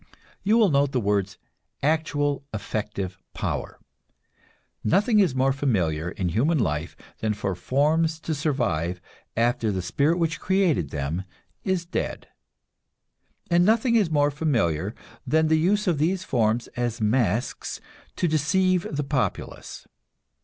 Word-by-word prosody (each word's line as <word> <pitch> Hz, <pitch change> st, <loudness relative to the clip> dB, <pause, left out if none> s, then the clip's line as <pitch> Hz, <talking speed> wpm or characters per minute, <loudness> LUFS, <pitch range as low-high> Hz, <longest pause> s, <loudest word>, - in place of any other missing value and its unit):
You 210 Hz, +3 st, +3 dB
will 220 Hz, -4 st, +5 dB
note 140 Hz, -2 st, +2 dB
the 130 Hz, -, +2 dB
words 100 Hz, -2 st, 0 dB, 0.5 s
"actual, 145 Hz, -2 st, +1 dB
effective 100 Hz, -3 st, -4 dB, 0.2 s
power." -, -, -3 dB, 1.0 s
Nothing 210 Hz, -, +3 dB
is 180 Hz, -10 st, +3 dB
more 135 Hz, +1 st, +3 dB
familiar 90 Hz, -, 0 dB
in 90 Hz, -1 st, -2 dB
human 140 Hz, -, +2 dB
life 75 Hz, -, -1 dB, 0.2 s
than 110 Hz, -1 st, 0 dB
for 100 Hz, -2 st, -2 dB
forms 155 Hz, -, +1 dB
to 160 Hz, -, -2 dB
survive 120 Hz, -, -1 dB, 0.4 s
after 115 Hz, -2 st, +2 dB
the 95 Hz, -2 st, -2 dB
spirit 150 Hz, -, +1 dB
which 165 Hz, -2 st, 0 dB
created 180 Hz, -, +1 dB
them 75 Hz, +6 st, -3 dB, 0.4 s
is 185 Hz, -2 st, 0 dB
dead; 170 Hz, -, -3 dB, 1.2 s
and 170 Hz, +1 st, +5 dB
nothing 230 Hz, +4 st, +3 dB
is 210 Hz, -7 st, +3 dB
more 145 Hz, -2 st, +2 dB
familiar 115 Hz, -, 0 dB, 0.3 s
than 160 Hz, 0 st, +3 dB
the 160 Hz, 0 st, +4 dB
use 205 Hz, +6 st, +2 dB
of 170 Hz, -6 st, +1 dB
these 180 Hz, +4 st, +1 dB
forms 115 Hz, -5 st, +1 dB
as 120 Hz, -1 st, -3 dB
masks 110 Hz, 0 st, 0 dB, 0.4 s
to 180 Hz, -, +1 dB
deceive 175 Hz, +4 st, +2 dB
the 150 Hz, -1 st, -2 dB
populace. 135 Hz, -2 st, -3 dB
140 Hz, 130 wpm, -25 LUFS, 105-165 Hz, 1.2 s, will